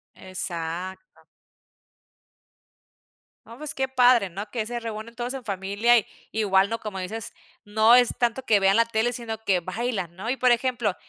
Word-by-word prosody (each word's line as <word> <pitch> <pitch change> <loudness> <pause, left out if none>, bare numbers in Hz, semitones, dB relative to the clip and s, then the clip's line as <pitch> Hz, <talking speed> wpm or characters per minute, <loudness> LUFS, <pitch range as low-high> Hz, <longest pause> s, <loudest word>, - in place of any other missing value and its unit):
Exacto. 185 - -6 2.3
No, 230 - -11
pues 300 +2 -4
qué 265 0 -1
padre, 250 -5 +4
¿no?, 200 +4 -7
que 225 -3 -3
se 240 +1 -3
reúnen 225 0 -6
todos 245 +1 -4
en 265 -2 -7
familia 200 +4 +2
y 225 - +1 0.3
igual, 195 -3 +3
¿no?, 230 +1 -2
como 210 -4 -6
dices, 210 +4 -5 0.3
no 220 +3 +5
es 245 -1 +5
tanto 240 +2 0
que 215 -5 +3
vean 195 +1 +4
la 230 - +5
tele 230 +1 0
sino 230 -2 -5
que 195 -4 +1
bailan, 190 -1 -3
¿no? 200 +5 -6
Y 255 - 0
por 255 -1 +3
ejemplo, 240 -4 +1
220 Hz, 170 wpm, -25 LUFS, 195-240 Hz, 2.3 s, no